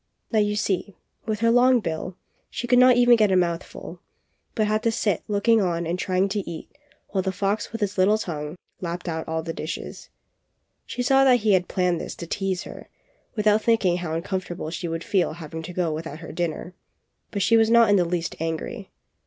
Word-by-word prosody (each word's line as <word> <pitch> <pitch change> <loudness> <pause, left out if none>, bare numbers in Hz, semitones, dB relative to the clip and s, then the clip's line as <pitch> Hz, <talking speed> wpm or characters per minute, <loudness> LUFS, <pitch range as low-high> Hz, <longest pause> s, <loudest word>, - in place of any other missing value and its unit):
Now 220 - +3
you 210 0 +1
see, 200 -1 -1 0.3
with 215 -1 -2
her 230 0 +4
long 250 +1 +5
bill, 175 -1 -4 0.3
she - - -4
could 245 0 +4
not 250 0 +7
get - - 0
even 235 -4 +5
a - - +3
mouthful, 170 -1 -3 0.6
but 215 - +2
had 215 +1 0
to 230 - +1
sit 210 -5 0
look 205 0 -2
ing 225 -1 +6
on 170 -2 -1
and 170 +2 -2
trying 185 +1 +1
to 205 +1 -1
eat 170 - -9 0.3
while 195 - 0
the 190 0 -1
fox 200 +2 -2
with 225 0 -6
his 200 -1 -1
little 205 +3 +4
tongue, 150 -6 -5 0.2
lapped 175 0 -5
out 160 -1 -3
all 160 0 -2
the 165 0 -4
dishes. 160 +2 -6 0.8
She 245 - -3
saw 270 +1 +4
that 250 -3 +5
he 210 -1 +3
had 180 -1 +2
planned 180 -3 0
this - - -6
to 170 - -7
tease 190 +1 -2
her, - - -11 0.5
without 210 0 +3
thinking 210 -7 +2
how 165 -3 -3
uncomfortable 175 -2 -4
she 170 +1 -4
would 165 0 -4
feel 185 -5 +1
having 160 -1 -7
to 165 +2 -7
go 175 -3 -1
without 155 -1 -6
her 165 0 -9
dinner; 175 +1 -3 0.6
but 200 -2 -1
she 230 - +4
was 225 -1 +4
not 230 0 +6
in - - +6
the 185 - +4
least 170 -1 -2
angry. 165 0 -4
190 Hz, 210 wpm, -24 LUFS, 170-215 Hz, 0.8 s, not